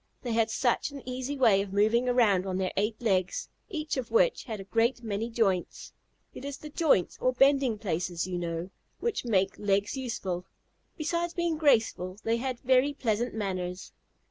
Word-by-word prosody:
They 245 - -3
had 225 0 +2
such 240 +4 +1
an 280 -3 -10
easy 255 +3 -3
way 220 -7 +5
of 200 -1 -5
moving 225 +5 +3
around 205 -7 +3
on 185 -1 -1
their 190 -1 -1
eight 210 +3 0
legs, 185 -4 0 0.2
each 310 -7 -3
of 255 -2 -3
which - - +2
had 220 -5 -5
a - - -6
great 230 +4 +1
many 220 +1 -2
joints. 200 -6 -1 0.4
It - - -9
is 280 -1 -5
the 300 +1 -10
joints, 290 - +2
or 255 - +2
bending 270 -3 +3
places, 175 -4 -2
you 180 -1 -3
know, 170 +1 -4 0.3
which 470 - -2
make 195 -4 +1
legs 200 +2 +1
useful. 195 -9 -4 0.5
Besides 340 +2 -1
being 345 -2 0
graceful, 220 - +2
they 225 +1 +1
had 255 0 -3
very 260 +2 +3
pleasant 235 -2 -1
manners. 185 -3 -4
230 Hz, 175 wpm, -29 LUFS, 195-265 Hz, 0.5 s, way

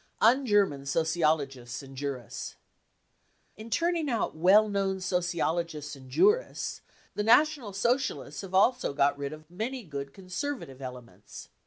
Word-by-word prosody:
Un 255 +4 +4
German 200 -9 +3
59 135 - -12
Sociologists 145 -6 0
and 135 0 -12
Jurists. 130 -5 -5 1.0
In 220 +2 -10
turning 335 +2 +1
out 230 -9 -1
well 190 +7 +6
known 195 -2 -1
sociologists 170 -4 -1
and 130 -1 -14
jurists 420 - +1 0.3
the - - -2
National 245 +1 +4
Socialists 245 +7 -1
have 190 -1 -6
also 245 - +3
got 140 0 +3
rid 140 0 -4
of 155 0 -10
many 235 +7 -4
good 140 -5 -6
conservative 185 - -5
elements. 125 -2 -10
180 Hz, 135 wpm, -29 LUFS, 140-225 Hz, 1.0 s, well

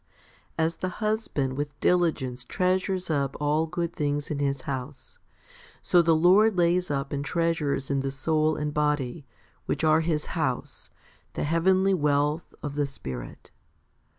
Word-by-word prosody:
3 160 - +3
As 165 - -2
the 185 - -2
husband 210 - -1
with 145 +1 -4
diligence 150 -8 +1
treasures 185 +3 0
up 140 -2 0
all 150 +2 +1
good 170 +1 -3
things 145 0 -2
in 145 - -2
his 140 -1 0
house, 135 +1 -6 0.6
so 175 - +5
the 165 -1 +3
Lord 190 +5 +5
lays 175 +1 +2
up 140 -1 -2
and 140 0 -2
treasures 150 -5 -1
in 140 - +1
the 135 0 -1
soul 155 +3 +1
and 150 -1 -3
body, 150 -1 -1 0.4
which - - -1
are 155 0 +4
His 160 -2 -2
house, - - -3 0.4
the - - -3
heavenly 185 +5 +3
wealth 150 -1 +1
of 145 -2 -3
the 145 -1 0
Spirit. 65 - -8
150 Hz, 150 wpm, -26 LUFS, 140-170 Hz, 0.6 s, so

